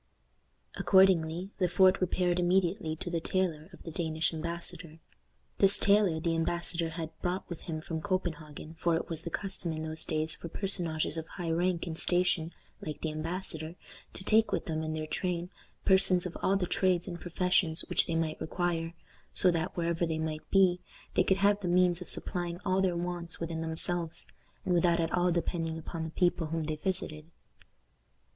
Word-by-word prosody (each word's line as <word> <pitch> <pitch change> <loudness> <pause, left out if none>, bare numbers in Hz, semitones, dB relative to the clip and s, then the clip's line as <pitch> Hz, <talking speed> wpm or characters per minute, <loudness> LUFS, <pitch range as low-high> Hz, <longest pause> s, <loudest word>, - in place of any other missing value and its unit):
Accordingly, 185 -1 +4
Le 180 - +3
Fort 185 +2 +4
repaired 180 -1 +1
immediately 175 -1 +1
to 175 +2 -6
the 170 - 0
tailor 165 -3 -1
of - - -14
the 165 - -7
Danish 160 -1 -1
embassador. 170 0 -6 0.6
This 195 0 +5
tailor 200 -5 +4
the 165 +1 0
embassador 165 0 -1
had 160 -1 -5
brought 180 +2 -2
with 170 - -7
him 160 -2 -5
from 160 0 -4
Copenhagen, 160 -5 -3
for 170 -1 +2
it 165 - -3
was 160 -1 -1
the 170 - -5
custom 190 -1 -3
in 155 0 -4
those 160 0 -5
days 155 0 0
for 170 - -7
personages 170 -4 +2
of 160 0 -4
high 170 -2 -4
rank 175 +1 +1
and 165 -2 -4
station, 175 -1 +1 0.3
like 155 -2 -5
the 160 - -1
embassador, 160 0 -4 0.4
to - - -8
take 220 +2 +4
with - - -1
them, 160 -1 -2
in 155 0 -3
their 155 0 -3
train, 175 +2 -2 0.3
persons 190 -1 +4
of 180 - -5
all 195 +1 +3
the 185 - 0
trades 180 0 +1
and 175 -3 -6
professions 175 -2 +1
which - - +1
they 165 - -1
might 160 -1 -1
require, 170 0 -1 0.4
so 180 - +7
that, 165 0 -2
wherever 170 0 0
they 160 -1 -1
might 160 -1 -4
be, 185 -2 +4 0.3
they 185 - +4
could 190 0 +2
have 200 +1 +3
the 190 - -4
means 175 0 +3
of 180 - -7
supplying 175 -1 -2
all 190 0 +2
their 180 -2 +1
wants 175 -1 -4
within 165 -1 -3
themselves, 165 +1 0 0.4
and 180 - +1
without 175 0 +3
at 165 -1 0
all 180 0 +3
depending 165 -1 -1
upon 160 +1 -5
the 160 - -4
people 175 -1 +1
whom 165 +1 -2
they 155 0 -3
visited. 165 -3 -3
170 Hz, 185 wpm, -30 LUFS, 160-180 Hz, 0.6 s, so